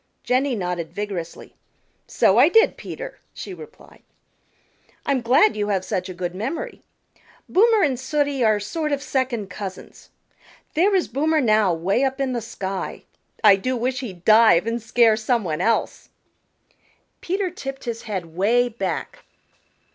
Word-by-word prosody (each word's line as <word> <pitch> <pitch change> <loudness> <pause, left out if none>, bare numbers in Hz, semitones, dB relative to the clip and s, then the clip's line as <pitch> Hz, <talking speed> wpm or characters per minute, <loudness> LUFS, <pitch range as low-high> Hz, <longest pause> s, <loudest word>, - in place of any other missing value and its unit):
Jenny 255 +1 +1
nodded 180 -4 -3
vigorously. 200 -5 -6 0.5
"So - - +3
I - - +7
did, 450 +1 +4
Peter," - - -8 0.2
she 390 - -7
replied. 445 +5 -14 1.0
"I'm 275 -3 +1
glad 265 - +4
you 205 -1 -1
have 190 -3 -1
such 185 0 -3
a - - -5
good 175 0 -4
memory. 275 - -5 0.7
Boomer 445 +1 +4
and 265 -5 +1
Sooty 285 -1 0
are 215 -2 +3
sort 300 +9 -3
of 285 0 -1
second 240 -8 -2
cousins. 190 -1 -9 0.6
There 385 +6 +3
is 370 - +1
Boomer 310 +5 +1
now, 215 -6 +3
way 195 +10 0
up 265 0 -1
in 265 -2 -1
the 240 - -2
sky. 195 -3 -5 0.4
I 205 -2 +7
do 255 +6 -2
wish 250 +2 -1
he'd 190 -9 -8
dive 215 -4 +6
and 230 +1 -2
scare 230 -1 +3
some 225 +1 0
one 160 -2 -3
else." 225 +4 -1 1.1
Peter 375 0 -2
tipped 270 -6 -7
his 235 -2 -4
head 190 -5 -4
'way 240 +6 +2
back. 240 - -4
235 Hz, 150 wpm, -22 LUFS, 200-280 Hz, 1.1 s, I